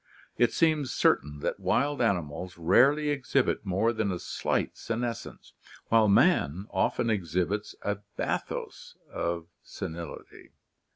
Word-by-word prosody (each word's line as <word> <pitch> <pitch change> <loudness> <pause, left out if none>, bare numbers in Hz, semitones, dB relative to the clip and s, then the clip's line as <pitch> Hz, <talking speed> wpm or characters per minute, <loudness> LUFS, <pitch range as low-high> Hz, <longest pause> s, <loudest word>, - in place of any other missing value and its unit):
It 120 - +3
seems 155 -5 +2
certain 75 +1 +1
that - - -2
wild 145 +2 +1
animals 90 -4 -1
rarely 135 - +4
exhibit 135 -5 0
more 100 +5 +2
than 110 -3 -1
a 90 - -2
slight - - -2
senescence, 115 0 -5 0.4
while 115 -1 +5
man 95 -3 +3
often 105 +4 +1
exhibits 95 +1 -1
a 105 -1 -1 0.2
bathos - - -4
of 85 -1 -2 0.2
senility. 85 +1 -8
105 Hz, 115 wpm, -28 LUFS, 85-120 Hz, 0.4 s, while